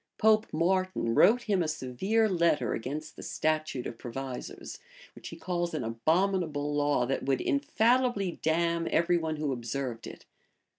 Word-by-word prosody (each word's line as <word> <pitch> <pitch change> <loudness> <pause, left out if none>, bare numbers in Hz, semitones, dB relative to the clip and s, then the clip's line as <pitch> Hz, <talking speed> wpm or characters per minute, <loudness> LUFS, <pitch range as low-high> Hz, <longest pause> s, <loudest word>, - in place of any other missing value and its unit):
Pope 215 0 +4
Martin 185 -6 0
wrote 230 - +5
him 200 -5 +1
a 165 - 0
severe 155 - 0
letter 170 - +1
against 150 +7 -5
the - - -10
statute 155 -5 -1
of 115 - -6
provisors; 130 +1 -7 0.3
which - - -11
he - - -8
calls 175 -2 -2
an 150 - -2
abominable 155 - 0
law, 145 -3 +2
that 135 - -1
would 135 -1 0
infallibly 220 - +1
damn 170 +1 +1
every 170 +1 +2
one 160 -1 -2
who 150 -2 -2
observed 120 0 -4
it. - - -11
155 Hz, 150 wpm, -29 LUFS, 135-185 Hz, 0.3 s, wrote